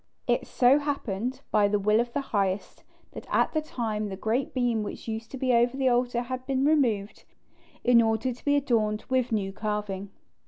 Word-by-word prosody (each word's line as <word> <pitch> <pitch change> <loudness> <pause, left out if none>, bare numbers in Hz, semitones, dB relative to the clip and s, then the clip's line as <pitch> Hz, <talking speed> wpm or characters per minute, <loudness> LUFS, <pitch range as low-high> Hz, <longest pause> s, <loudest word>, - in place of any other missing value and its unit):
It - - 0
so 255 +3 +4
happened, 255 -5 -3
by 210 -1 +4
the 205 +1 +1
will 210 +2 +2
of 240 0 -1
the 285 - -1
Highest, 200 -6 -2 0.3
that - - -10
at - - +2
that 310 -1 -1
time 215 -6 -3
the 190 - -5
great 230 +6 -1
beam 245 -3 0
which 210 - -7
used 225 0 -4
to 270 - -7
be 255 -1 +1
over 240 +2 +3
the 265 -1 +2
altar 245 0 +1
had 255 +1 -5
been 270 0 +1
removed, 235 -10 +1 0.6
in 240 -1 +6
order 225 +3 0
to 240 - -17
be 285 0 +2
adorned 220 -6 +1
with 255 -1 +1
new 195 -3 -1
carving. 210 -2 -3
235 Hz, 195 wpm, -27 LUFS, 210-260 Hz, 0.6 s, in